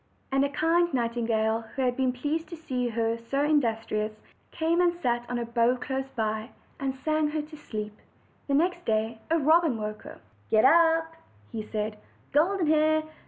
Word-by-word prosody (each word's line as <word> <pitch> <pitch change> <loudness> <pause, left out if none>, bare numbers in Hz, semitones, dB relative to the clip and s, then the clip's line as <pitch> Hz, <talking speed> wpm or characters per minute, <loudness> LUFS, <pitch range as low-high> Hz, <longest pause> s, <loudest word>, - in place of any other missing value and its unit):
And 270 0 +3
a 280 - +1
kind 330 +4 +2
nightingale, 230 -2 0
who 270 - 0
had 250 -1 +1
been 260 -1 +1
pleased 300 +6 -3
to 340 - -6
see 255 -6 -2
her 230 0 -1
so 275 +5 -1
industrious, 225 -7 +1 0.4
came 330 +2 +1
and 350 -1 +4
sat 240 -7 -1
on 245 - -1
a 240 - -2
bough 235 +1 +2
close 265 +2 -4
by, 220 0 -2 0.3
and 270 -1 -2
sang 310 +3 0
her 300 0 -2
to 310 +1 -11
sleep. 215 -7 -6 0.5
The 280 - +1
next 350 +3 +1
day 220 +1 0
a 330 - +3
robin 315 -3 +4
woke 215 0 -5
her. - - -11 0.3
"Get 215 +1 +4
up," 325 +2 +4 0.4
he 220 - -3
said, 210 0 -4 0.3
"Golden 345 +5 +2
Hair. 310 0 +3
265 Hz, 175 wpm, -27 LUFS, 230-315 Hz, 0.5 s, and